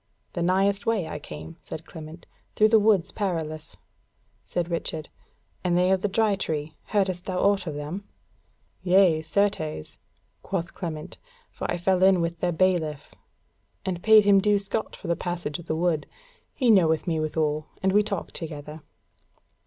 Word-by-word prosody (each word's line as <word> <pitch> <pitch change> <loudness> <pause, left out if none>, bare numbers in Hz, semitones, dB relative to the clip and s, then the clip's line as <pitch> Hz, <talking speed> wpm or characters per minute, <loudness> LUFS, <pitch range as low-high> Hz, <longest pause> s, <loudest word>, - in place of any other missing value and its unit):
"The 175 - -3
nighest 195 +3 +2
way 215 -7 +1
I 150 - -5
came," 150 +3 -9
said 160 - -8
Clement, 160 +1 -10 0.3
"through 215 0 +5
the 220 0 +6
Woods 205 -4 +3
Perilous." 160 -5 -3 0.7
Said 175 -1 -1
Richard: 160 -2 -3 0.5
"And 175 -1 +2
they 180 +1 +3
of 190 -1 +2
the 205 - +1
Dry 210 +1 +2
Tree, 155 -5 -3
heardest 190 -4 0
thou 185 -1 -2
aught 200 -2 +2
of 155 - -3
them?" 155 +7 -5 0.8
"Yea, 180 -3 +4
certes," 160 - -1 0.4
quoth 175 -3 -3
Clement, 155 -4 -6 0.3
"for - - -5
I - - 0
fell 185 +1 +1
in 190 -1 +6
with 170 0 -2
their 175 - +1
Bailiff, 165 -4 0 0.7
and 180 -2 -2
paid 220 0 +7
him 200 -1 +6
due 210 +1 +3
scot 200 +2 -3
for 195 - -9
the 170 - +2
passage 175 -4 -4
of 170 - -12
the 155 - 0
Wood; 165 -2 0 0.4
he 250 -5 +3
knoweth 160 -6 +4
me 165 -3 0
withal, 155 -1 -1 0.2
and 190 - +3
we 210 - +6
talked 200 -3 -4
together." 155 -1 -7
175 Hz, 165 wpm, -26 LUFS, 160-195 Hz, 0.8 s, paid